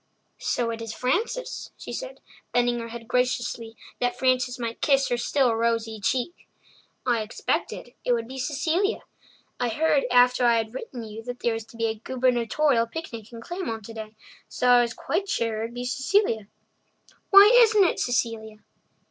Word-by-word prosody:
"So 235 -1 -1
it 230 0 -6
is 225 -1 -6
Frances," 410 - -2
she - - -8
said, - - -6 0.3
bending 240 0 +2
her 230 - -5
head 230 0 -9
graciously 245 -2 -1 0.2
that 245 0 0
Frances 255 0 +1
might 230 -2 -5
kiss 275 -1 +3
her 245 - +1
still 250 0 +2
rosy 225 -1 -1
cheek. 260 - -2 0.6
"I 240 -3 +2
expected 225 +2 -3
it - - 0
would 230 -1 -1
be 265 +1 -7
Cecilia. 320 - 0 0.6
I 245 -1 0
heard 290 +4 +2
after 250 0 +4
I 235 -1 +5
had 220 0 -2
written 255 - -7
you 220 0 -8
that 245 0 -6
there 235 - +1
was 225 -1 -5
to 230 - -15
be 230 - 0
a 220 -1 -2
gubernatorial 245 +1 +1
picnic 230 -6 -7
in 230 -1 -9
Claymont 230 - -5
today, 220 -1 -8 0.3
so 250 - 0
I 245 0 +7
was 240 0 -2
quite 390 +4 -2
sure 225 -2 -1
it - - -1
would 235 +1 -9
be 245 0 -4
Cecilia. 260 - +1 0.8
Why 400 +2 +9
isn't 445 -4 +6
it 360 - +1
Cecilia?" 225 -3 -1
245 Hz, 175 wpm, -25 LUFS, 230-265 Hz, 0.8 s, Why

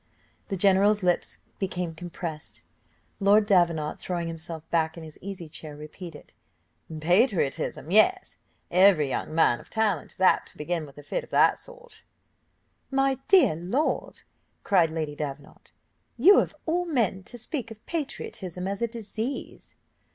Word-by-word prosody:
The 195 - -3
general's 200 +2 +4
lips 180 -1 +1 0.2
became 180 -3 -2
compressed. 165 -2 -7 0.6
Lord 205 +1 +5
Davenant, 170 -6 +2
throwing 175 -2 -3
himself 165 -1 -6
back 160 -1 +1
in 165 - -8
his 155 -1 -11
easy 190 -3 -7
chair, 155 -1 -9
repeated, 155 +2 -10 0.7
"Patriotism! 175 - +1
yes, 370 - +3 0.3
every 180 -5 +5
young 155 - -3
man 140 -7 +4
of - - -16
talent 210 -8 0
is - - -17
apt 190 - +4
to - - -17
begin 160 0 -3
with 140 - -16
a 145 - -10
fit - - -3
of 485 - -14
that - - +4
sort." 485 -2 -12 0.9
"My 270 -1 +1
dear 375 - +6
lord," 190 - -2 0.4
cried 180 -6 +4
Lady 155 -2 -3
Davenant, 145 -1 -7 0.5
"you, 370 - +7
of - - -1
all 350 +2 0
men, 235 - 0
to 245 - -10
speak 245 +1 -4
of 220 -1 -13
patriotism 190 - -4
as 200 +3 -3
a 235 - +2
disease!" 230 +2 -5
185 Hz, 145 wpm, -26 LUFS, 160-225 Hz, 0.9 s, you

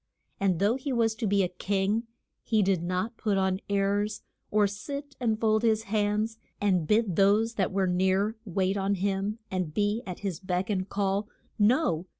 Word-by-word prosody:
And 190 -3 +2
though 205 +7 +2
he 270 +1 -4
was 230 -3 +2
to 220 0 -3
be 200 0 +3
a - - +1
king 195 +5 -1 0.3
he 220 -3 +2
did 190 -3 +1
not 185 +6 -2
put 205 -3 0
on 190 -1 +1
airs, 200 +1 0 0.3
or 210 0 +3
sit 280 +8 -5
and 220 -3 0
fold 220 -1 +2
his 220 -2 +2
hands 215 +1 0 0.2
and 185 -6 +1
bid 210 -4 +2
those 210 +4 +4
that 195 -4 0
were 195 0 +1
near 190 +4 +1
wait 190 -1 0
on 195 +1 +1
him 195 +2 -1
and 180 -5 -2
be 205 +2 +1
at 180 - -6
his 195 -5 -3
beck 185 +1 -2
and 185 -1 -1
call. 200 +1 0 0.3
No! 210 - +2
200 Hz, 180 wpm, -28 LUFS, 190-220 Hz, 0.3 s, those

